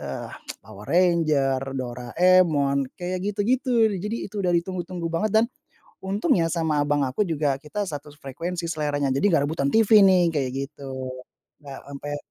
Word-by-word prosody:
eee, 70 -1 -6 0.3
Power 105 0 -12
Ranger, 155 -6 +2 0.2
Doraemon, 140 +3 +2
kayak 180 +1 -3
gitu-gitu, 230 +2 +2
jadi 210 +4 -3
itu 210 - -6
udah 180 -1 +1
ditunggu-tunggu 175 0 -2
banget, 210 +6 0
dan, - - +1 0.5
untungnya 195 - +1
sama 160 -2 0
abang 145 0 +1
aku 135 +9 0
juga 150 -5 0
kita 150 +9 -5
satu 145 -1 -7
s - - -21
frekuensi 170 +5 -4
seleranya, 145 -3 -1
jadi 135 +8 0
nggak 145 - +3
rebutan 150 -4 -1
TV 220 -1 +6
nih, 185 -2 +5
kayak 135 -5 -1 0.2
gitu, 140 -1 -13 0.8
nggak 140 -2 -9
ampe 145 +1 -5
165 Hz, 150 wpm, -24 LUFS, 140-185 Hz, 0.8 s, TV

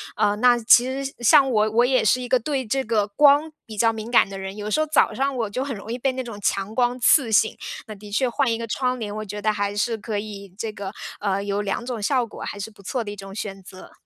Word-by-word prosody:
呃， 205 -1 +2
那 245 +2 +5
其 240 +1 +6 0.2
实， 275 - -5
像 270 +3 +5
我 215 -2 +2
我 235 +3 +4
也 255 -2 +2
是 235 +4 +3
一 250 - -5
个 255 - +4
对 265 +1 -2
这 270 +5 0
个 215 -4 +1
光 290 +7 +4
比 215 -2 -10
较 225 +2 +4
敏 220 0 -7
感 240 - +4
的 195 -1 -7
人， 190 0 -6
有 210 0 -5
时 310 - +2
候 310 - +2
早 310 0 +2
上 275 +1 -1
我 230 -4 -2
就 255 +6 -2
很 275 -3 -4
容 210 +2 -8
易 240 - -2
被 260 +1 0
那 260 0 -4
种 230 -4 -8
强 195 +2 -1
光 245 +1 +1
刺 250 0 +4
醒。 220 +1 +3 0.3
那 215 - -7
的 205 +1 -12
确 250 +4 +1
换 250 +1 +1
一 225 - 0
个 230 - -4
窗 250 +3 -1
帘， 210 -3 -4
我 215 0 -5
觉 210 +1 -6
得 215 +1 +2
还 205 -1 -2
是 225 +2 0
可 215 0 -4
以 200 -2 -7
这 220 0 -3
个， 200 -2 -6 0.3
呃， 200 -1 -1
有 200 0 -1
两 205 +3 -3
种 245 -3 -4
效 250 +3 +1
果 225 - -12
还 - - -5
是 205 +3 -6
不 210 - -18
错 235 +5 -3
的 205 - -6
一 - - -7
种 195 0 -9
选 195 -2 -6
择。 185 0 -13
220 Hz, 300 characters per minute, -23 LUFS, 205-250 Hz, 0.3 s, 其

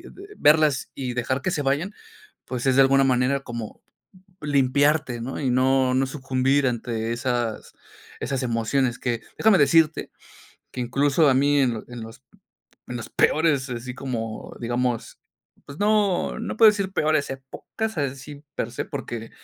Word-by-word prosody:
y - - -15 0.4
verlas 150 -3 +3
y 130 -2 -4
dejar 130 +3 -1
que 185 - 0
se 155 - -2
vayan, 145 +9 -1 0.5
pues 125 -2 -4
es 130 - +3
de 135 - +7
alguna 135 0 +4
manera 130 +1 +2
como 120 -4 -7 0.6
limpiarte, 145 -1 +2
¿no? 135 +4 -5
Y 135 - 0
no 130 +1 +3
no 130 +1 +2
sucumbir 135 0 0
ante 115 -1 -2
esas 120 -2 -2 0.5
esas 135 0 -2
emociones 120 +1 0
que, 120 -3 -2 0.2
déjame 220 -3 +5
decirte, 160 +1 +3 0.6
que 125 - -5
incluso 140 +5 +2
a 130 - +4
mí 145 +2 +3
en 120 -4 0
en 120 -1 -8
los 115 +3 -11 0.7
en 125 - -5
los 115 - -7
peores, 150 -4 +2
así 125 +1 -5
como, 115 -4 -5
digamos, 120 0 -2 0.5
pues 140 +2 -10
no 205 -3 +1
no - - -4
puedo 220 -1 +8
decir 200 -2 -3
peores 155 -4 +1
épocas, 145 +10 -6
así 140 +1 -4
per 115 - -3
se, - - -3
porque, 120 -5 -6
135 Hz, 155 wpm, -24 LUFS, 125-145 Hz, 0.7 s, puedo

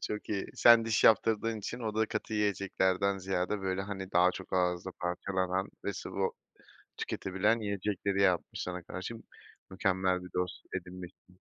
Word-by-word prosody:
Çok 105 - -4
iyi. 100 -2 -1
Sen 115 -1 +7
diş 115 -2 +1
yaptırdığın 110 0 +4
için 120 +4 -5
o 110 -2 -3
da 110 0 +2
katı 110 0 -3
yiyeceklerden 100 -1 +1
ziyade 95 +1 -1
böyle, 95 0 -1
hani, 95 -1 -6
daha 90 +1 +5
çok 95 - -9
ağızda 90 0 +1
parçalanan 95 +1 -1 0.2
ve 100 - -1
sıvı 95 0 -2 0.7
tüketebilen 105 +5 0
yiyecekleri 100 -1 -1
yapmış 90 -3 +1
sana, 90 -1 -5
karşı. 95 +7 -6 0.6
Mükemmel 95 -2 +1
bir 90 - -9
dost 90 0 -3
edinmişsin. 90 0 -9
95 Hz, 145 wpm, -31 LUFS, 90-105 Hz, 0.7 s, Sen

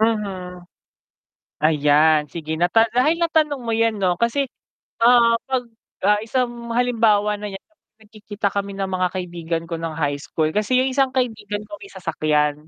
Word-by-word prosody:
Mhm. 190 -5 -2 1.0
Ayan, 150 0 +4
sige 160 +1 -5
nata 180 +6 +4
dahil 300 +8 +2
natanong 310 -4 +1
mo 230 -1 -3
yan 225 0 +2
'no 180 -2 +1
kasi, 260 +4 0 0.5
ah, 235 0 +6
'pag 260 -2 0 0.4
ah, 210 +1 +4
isang 240 0 -2
halimbawa 225 -4 +2
na 210 0 -6
niyan 195 -1 -9
kapag 315 -8 -44
nagkikita 210 -1 -4
kami 200 0 -2
ng 195 -1 -2
mga 185 0 +1
kaibigan 170 -2 -3
ko 170 - -4
nung 165 -1 -4
high 145 -2 -1
school, 155 +1 -1
kasi 210 +4 +1
yung 260 +1 +1
isang 265 0 +2
kaibigan 210 -5 -2
ko 205 0 -9
may - - -10
sasakyan, 150 -4 -1
210 Hz, 160 wpm, -21 LUFS, 170-235 Hz, 1.0 s, ah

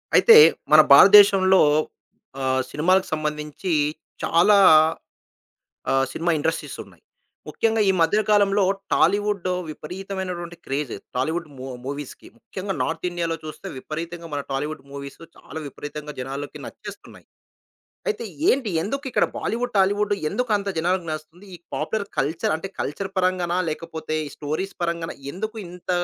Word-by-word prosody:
అయితే 460 - +8 0.4
మన - - +9
భారతదేశంలో 195 -2 +7 0.8
ఆహ్, 130 0 +1
సినిమాలకు 185 +5 +2
సంబంధించి 150 +3 -3 0.5
చాలా 180 +5 +4 1.3
ఆహ్, 135 0 +2
సినిమా 170 +1 -1
ఇండస్ట్రీస్ 160 +2 -3
ఉన్నాయి. - - -21 0.5
ముఖ్యంగా 225 -1 +1
ఈ - - +3
మధ్య 165 +6 +3
కాలంలో 205 -1 +4 0.3
టాలీవుడ్ 205 +1 +1 0.2
విపరీతమైనటువంటి 180 +1 -6
క్రేజ్ 135 -2 -3 0.2
టాలీవుడ్ 160 +6 -1
ము 130 - -7 0.2
మూవీస్‌కి. 140 0 -7
ముఖ్యంగా 195 -3 -6
నార్త్ - - -3
ఇండియా‌లో 170 -1 -2
చూస్తే 155 +5 -9
విపరీతంగా 165 +4 -6
మన 145 - -2
టాలీవుడ్ 145 +2 -3
మూవీస్ 140 0 -8 0.2
చాలా - - -9
విపరీతంగా 150 +2 -8
జనాలకి 135 +3 -6
నచ్చేస్తున్నాయి. - - -11 0.8
అయితే 425 - -2 0.2
ఏంటి? 255 -5 +1
ఎందుకిక్కడ 270 +5 0
బాలీవుడ్, 245 +2 -3
టాలీవుడ్ 205 +2 +2 0.2
ఎందుకు 245 +5 -2
అంత 200 0 -4
జనాలకి 175 +1 0
నచ్చుతుంది? 155 +5 -8
ఈ - - -12 0.2
పాపులర్ 215 -2 -2
కల్చర్ 160 +3 0
అంటే 165 +4 -5
కల్చర్ 190 +7 -3
పరంగానా 180 -1 +1
లేకపోతే 160 0 -5
ఈ - - -8
స్టోరీస్ 155 +6 -4
పరంగానా? 170 -1 -3 0.2
ఎందుకు 220 +4 -5
ఇంత 180 +1 -14
175 Hz, 125 wpm, -23 LUFS, 155-195 Hz, 1.3 s, మన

